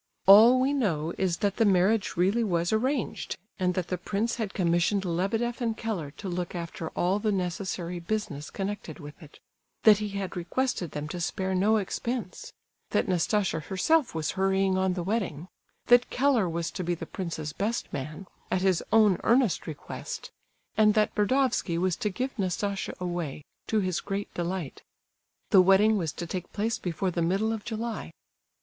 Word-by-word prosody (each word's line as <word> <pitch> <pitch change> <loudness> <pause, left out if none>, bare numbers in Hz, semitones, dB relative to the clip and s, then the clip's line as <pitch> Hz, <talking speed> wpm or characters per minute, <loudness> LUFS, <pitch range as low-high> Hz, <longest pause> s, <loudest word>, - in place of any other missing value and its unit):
All 225 +6 +9
we 265 +2 +2
know 170 - 0
is, 180 -3 +1
that 200 -1 0
the - - +4
marriage 200 +1 +2
really 195 +7 +2
was 175 -2 0
arranged, 255 +2 -1 0.2
and 180 -1 +1
that 180 -2 -2
the 180 - -2
prince 210 +6 -1
had 215 -4 -3
commissioned 180 +2 +1
Lebedeff 215 +8 -1
and 225 -2 -1
Keller 210 -11 -3
to 200 - -6
look 180 0 -3
after 170 -1 -5
all 185 +3 +2
the 215 0 0
necessary 180 -1 -3
business 170 -5 -3
connected 200 -1 -5
with 145 -1 -11
it; 150 -2 -14 0.4
that 210 -2 +7
he 210 -1 -3
had 195 -1 -4
requested 180 +1 -1
them 150 0 -4
to 175 +2 -5
spare 190 +2 -1
no 205 +4 +3
expense; 235 - -4 0.4
that - - +1
Nastasia 185 0 +1
herself 215 - +1
was 155 -2 -1
hurrying 190 0 +1
on 190 -1 +1
the 175 - -2
wedding; 185 -5 -2 0.4
that 245 0 +5
Keller 250 -8 +2
was 165 0 -2
to 185 - -4
be 175 0 0
the - - -7
prince's 160 -5 -5
best 220 +7 -2
man, 155 +7 -5 0.2
at 185 - 0
his 190 -3 +2
own 210 -4 +5
earnest 240 -4 +2
request; 155 -3 -7 0.4
and 215 -1 +4
that 215 -1 +2
Burdovsky 230 -5 +1
was 180 0 +1
to 215 -4 -1
give 250 +6 -4
Nastasia 200 +1 -2
away, 175 -5 -4 0.2
to 215 -1 +1
his 185 -3 -1
great 200 0 -4
delight. 175 -4 -4 0.7
The 190 - +8
wedding 195 +4 +5
was 165 -6 -1
to 175 - -5
take 180 +1 -5
place 220 +2 -1
before 180 +1 -2
the 170 - -2
middle 195 +6 +1
of 220 -2 -5
July. 225 0 -4
190 Hz, 175 wpm, -28 LUFS, 175-220 Hz, 0.7 s, All